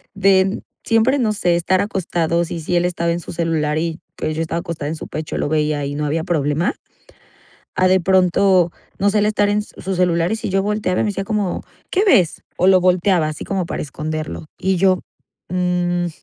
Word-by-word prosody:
de 195 0 +3 0.2
siempre, 230 +5 +3
no 220 -4 +2
sé, 175 -4 +1
estar 180 +2 +1
acostados, 170 -4 -1
y 170 - -3
si 175 - -1
él 175 0 +2
estaba 170 -1 0
en 170 - -1
su - - -8
celular 160 -3 0
y 165 0 -2 0.2
pues 155 - -3
yo 160 - -1
estaba 165 +1 -2
acostada 165 -4 -4
en 160 - -3
su - - -8
pecho 155 0 -5
lo - - -1
veía 150 -2 0
y 140 - -3
no 150 0 -2
había 160 +2 -1
problema. 155 -1 0 1.0
A 185 - +3
de 185 0 +3
pronto, 185 0 +3 0.3
no 200 +1 +3
sé, 210 - +2
él 205 - +2
estar 210 -1 +2
en 210 +1 +1
su 195 -2 -6
celular 175 0 +2
y - - +1
si - - -4
yo 195 +1 +2
volteaba 205 -3 0
y - - +2
me - - 0
decía 195 0 -3
como: 210 -4 -1 0.3
"¿Qué 390 - +2
ves?". 180 - +3
O 180 - +3
lo 190 -1 +6
volteaba 180 -2 +3
así 155 - -6
como 190 -3 -1
para - - -4
esconderlo. 155 +2 -5
Y 190 0 +1
yo: 185 0 +3 0.5
"Mm, 180 -1 0
180 Hz, 210 wpm, -19 LUFS, 165-190 Hz, 1.0 s, lo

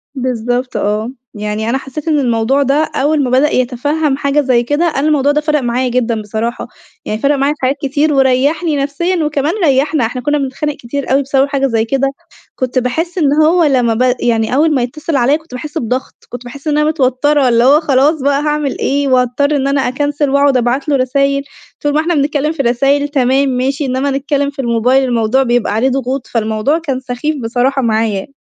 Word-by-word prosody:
بالضبط 250 0 -2
آه، 215 +4 -1 0.2
يعني 210 +1 -3
أنا 265 - +1
حسّيت 270 +4 -8
إن 300 -2 +2
الموضوع 245 +2 +1
ده 285 +4 +1
أول 290 +1 +1
ما 255 - -1
بدأ 265 +4 +3
يتفهّم 275 +4 0
حاجة 280 +1 +1
زي 250 -3 +2
كده، 290 +7 0
أنا 300 -2 0
الموضوع 290 -2 +2
ده 300 - +1
فرَق 300 0 +1
معايا 250 +1 -1
جدًا 235 -3 -1
بصراحة، 220 +3 -4 0.4
يعني 215 +1 -3
فرَق 285 +1 +2
معايا 275 +2 +1
في 300 - -20
حاجات 260 +2 +1
كتير 295 +2 0
وريّحني 280 +5 +2
نفسيًا 315 +5 -1
وكمان 300 +1 -1
ريّحنا 275 -1 +2
إحنا 245 +2 -4
كنا 295 +3 0
بنتخانق 285 +2 -3
كتير 270 +2 -5
أوي 275 +1 +3
بسبب 275 0 +1
حاجة 275 -1 0
زي 225 -3 0
كده، 275 +3 0 0.5
كنت 255 0 -1
باحس 320 +9 -3
إن 290 -5 +2
هو 335 +3 +3
لمّا 250 -6 +2
ب 250 +2 +1
يعني 230 0 0
أول 305 +2 +3
ما 255 - +1
يتّصل 300 +5 -3
عليّا 270 +2 +3
كنت 315 -4 -18
باحس 295 +5 -6
بضغط، 255 -1 -3
كنت 245 0 -8
باحس 275 +5 -10
إن 300 -1 +1
أنا 300 0 +2
متوتّرة، 280 -1 +2
اللي 235 0 +3
هو 280 +4 +5
خلاص 290 0 +2
بقى 280 +1 +1
هاعمل 300 -2 -1
إيه، 280 0 0
وأضطر 255 +3 +1
إن 275 -1 0
أنا 275 0 +1
أكنسل 290 +2 -1
وأقعد 280 -1 +3
أبعت 250 +5 -1
له 285 - +3
رسايل، 275 +2 +1 0.4
طول 290 0 0
ما 305 - +2
إحنا 340 +2 -1
بنتكلّم 295 +1 0
في 315 -4 -2
رسايل، 275 +4 +1
تمام 270 -1 +1
ماشي، 270 +3 -1
إنما 265 +2 -1
نتكلّم 280 +1 -1
في 280 -1 -14
الموبايل 245 +2 +2
الموضوع 240 +1 +1
بيبقى 240 -4 0
عليه 235 +5 +1
ضغوط، 265 0 -3
فالموضوع 220 +6 0
كان 275 -6 -3
سخيف 260 +4 -3
بصراحة 250 +4 0
معايا. 220 -4 0
270 Hz, 200 wpm, -14 LUFS, 250-290 Hz, 0.5 s, هو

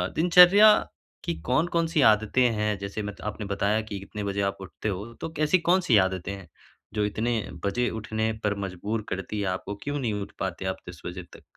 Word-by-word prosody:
दिनचर्या 180 +5 +8 0.5
की 85 - -2
कौन-कौन 165 - +1
सी 160 -2 +1
आदतें 110 +4 -1
हैं, 105 -1 -1
जैसे 100 +2 -5
मत 105 -1 -7
आपने 105 0 -4
बताया 100 +2 0
कि 105 -2 -6
कितने 105 +2 -7
बजे 100 0 -2
आप - - -19
उठते 95 +3 -5
हो, 100 +4 -5
तो - - -3
कैसी 155 +4 +3
कौन-सी 180 - +4
आदतें 95 0 -5
हैं 95 -3 -10 0.5
जो 105 -1 +1
इतने 110 +3 -1 0.3
बजे 120 +5 0
उठने 110 0 -2
पर 105 -1 +1
मजबूर 105 +4 -4
करतीं 95 +2 -4
हैं 100 - -1
आपको? 95 +2 -3
क्यों 145 0 -2
नहीं 120 -5 -1
उठ 100 - -7
पाते 95 - -3
आप 95 - -2
10 90 - -11
बजे 90 +1 -6
तक? - - -14
105 Hz, 195 wpm, -26 LUFS, 100-125 Hz, 0.5 s, दिनचर्या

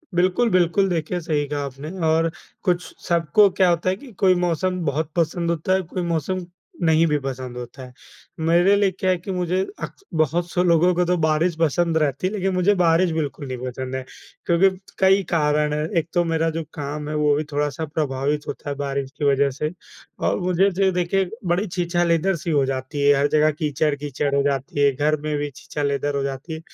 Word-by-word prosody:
बिल्कुल, 185 +7 +2
बिल्कुल 185 +1 +3
देखिए 175 +1 -1
सही 150 -3 -1
कहा 145 0 -3
आपने 140 +3 -7 0.2
और 165 +1 +3 0.3
कुछ 175 -1 +1 0.3
सबको 170 +4 +4
क्या 185 -1 +3
होता 170 +1 +1
है 185 - +1
कि 255 +5 -13
कोई 185 -1 +5
मौसम 180 +1 0
बहुत 150 +2 -1
पसंद 170 0 0
होता 170 +2 0
है, 190 - +2
कोई 180 +1 -5
मौसम 170 +2 -2 0.4
नहीं 160 +1 +4
भी 150 -1 +2
पसंद 130 -2 -5
होता 125 +2 -8
है। 125 - -14 0.5
मेरे 175 +4 +5
लिए 200 -1 +2
क्या 185 0 -2
है 180 - +1
कि 180 +3 -7
मुझे 180 0 0 0.2
अक - - -5 0.3
बहुत 170 +4 0
से 180 - +1
लोगों 175 +1 +4
को 180 +1 +2
तो 180 +1 +1
बारिश 155 +2 +1
पसंद 165 +1 +2
रहती 150 +2 0
है 195 - -4
लेकिन 195 -2 -1
मुझे 185 +3 +3
बारिश 170 +1 +3
बिल्कुल 150 -2 -3
नहीं 130 -1 -4
पसंद 130 +1 -5
है, 130 - -3 0.4
क्योंकि 180 +3 +4 0.3
कई 195 +1 +4
कारण 150 -2 +1
हैं, 150 0 -1
एक 165 -5 0
तो 175 -1 +3
मेरा 165 -1 0
जो 165 +1 -3
काम 150 +1 -5
है 155 - -3
वो 150 -1 +3
भी 150 - -1
थोड़ा-सा 145 +1 -1
प्रभावित 145 -1 -2
होता - - -6
है 140 - -2
बारिश 140 -1 -3
की 150 - -1
वजह 140 0 +3
से। 150 0 -1 0.5
और - - 0
मुझे 185 +1 +2
जो 195 +2 0
है 190 - +3
देखिए 180 +1 0 0.2
बड़ी 180 +4 +1
छीछा-लेदर 175 0 +1
सी 170 +1 -4
हो 145 -3 +3
जाती 135 +2 -3
है, 145 - +7
हर 145 - +3
जगह 155 +1 +3
कीचड़-कीचड़ 145 -2 -1
हो 140 - +3
जाती 140 0 -2
है, 140 - +5
घर 150 +3 +1
में 150 0 -2
भी 145 0 -2
छीछा-लेदर 145 0 -2
हो 140 - 0
जाती 135 +4 -5
है, 160 - -5
160 Hz, 210 wpm, -22 LUFS, 145-180 Hz, 0.5 s, है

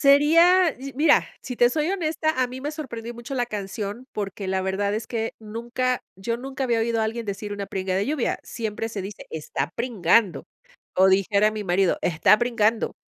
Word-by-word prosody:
Sería 330 +5 +5
y 275 +1 -7
mira, 295 +2 +4 0.2
si 250 -2 -6
te 240 - +5
soy 310 +4 0
honesta, 315 -4 0
a - - +2
mí 255 +1 -8
me 290 +2 -3
sorprendió 240 -7 -6
mucho 240 +3 -7
la 245 -1 0
canción 210 +2 -5
porque 200 -1 -4
la 190 0 0
verdad 200 +2 -1
es 215 +1 -4
que 225 -1 -2
nunca 240 +3 -2
yo 195 +5 -3
nunca 265 +2 -4
había 235 -3 +1
oído 230 0 0
a 220 - +2
alguien 225 0 -3
decir 205 +1 -4
una 200 -1 -4
pringa 190 -1 -2
de 200 - 0
lluvia. 290 -3 -1
Siempre 225 -1 -4
se 210 -4 -5
dice 195 +2 -8
está 150 -1 -3
pringando. 210 - +2 0.5
O 190 +1 +5
dijera 200 +2 +3
mi 215 -1 -5
marido 185 0 +2
está 175 +5 +4
pringando. 230 -2 +1
225 Hz, 195 wpm, -24 LUFS, 200-255 Hz, 0.5 s, Sería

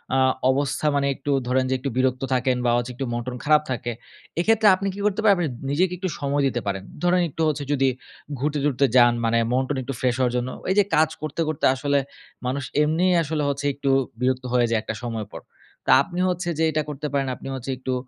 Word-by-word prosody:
আ - - +3 0.3
অবস্থা 140 +2 -1
মানে 140 0 +1
একটু 145 - -4 0.2
ধরেন 130 +1 +2
যে - - +1
একটু 140 +2 -3
বিরক্ত 130 0 +1
থাকেন 125 0 +1
বা 120 - +3
হচ্ছে 120 +1 -2
একটু 135 - -3
মন-টন 120 +1 -4
খারাপ 150 0 +4
থাকে। 120 -1 -2 0.5
এক্ষেত্রে 220 +4 +3
আপনি 195 +1 -3
কি - - -8
করতে 210 +1 +1
পারবেন? 190 -5 +4
আপনি 120 - -9
নিজেকে 180 +5 +1
একটু 185 0 -3
সময় 140 0 0
দিতে 120 -2 -2
পারেন। 95 -1 -2 0.2
ধরেন 180 0 +3
একটু 160 - -6
হচ্ছে 145 -1 -2
যদি 135 -2 +2 0.5
ঘুরতে-টুরতে 145 -1 +1
যান 120 -1 +7
মানে 115 0 +2
মন-টন 130 +2 0
একটু 135 - -4
ফ্রেশ 125 -2 +1
হওয়ার 125 -1 +1
জন্য। 125 +1 -2 0.2
এই 190 - +2
যে 205 - +6
কাজ 155 0 +4
করতে, 155 +2 -3
করতে 155 -2 -1
আসলে 140 +1 +1 0.5
মানুষ 130 +2 -1 0.2
এমনিই 170 +4 +2
আসলে 150 0 -2
হচ্ছে 140 +1 -3
একটু 140 0 -2 0.3
বিরক্ত 130 0 0
হয়ে 120 -1 +3
যায় 115 - +2
একটা 110 - -5
সময় 115 -3 -4
পর। - - -7 0.5
তা - - +4
আপনি 175 +4 -6
হচ্ছে 180 0 -2
যে - - +3
এটা 155 - 0
করতে 150 +1 -4
পারেন। 140 -1 0
আপনি - - -10
হচ্ছে 130 +1 -7
একটু 130 0 -3
140 Hz, 215 wpm, -23 LUFS, 125-155 Hz, 0.5 s, যান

